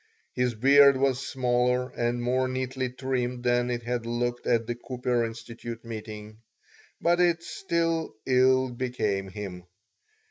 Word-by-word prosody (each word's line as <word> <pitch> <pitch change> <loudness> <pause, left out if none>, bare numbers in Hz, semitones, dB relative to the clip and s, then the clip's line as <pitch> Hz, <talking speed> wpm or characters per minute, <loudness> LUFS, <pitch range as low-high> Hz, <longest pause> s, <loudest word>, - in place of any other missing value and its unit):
His 125 -2 0
beard 140 +3 +6
was 135 -1 +1
smaller 125 0 +1
and 120 0 -1
more 130 +1 +1
neatly 130 0 -2
trimmed 125 -1 -2
than 120 0 +2
it 120 -1 -2
had 120 -1 -3
looked 120 +1 -2
at 115 -1 +2
the 120 - -2
Cooper 125 0 -1
Institute 115 0 -7
meeting, 110 -1 -8 0.6
but 175 +1 +2
it 170 -1 +3
still 165 - -1
ill 130 0 +3
became 110 -6 -2
him. 95 -3 -7
125 Hz, 135 wpm, -27 LUFS, 115-130 Hz, 0.6 s, beard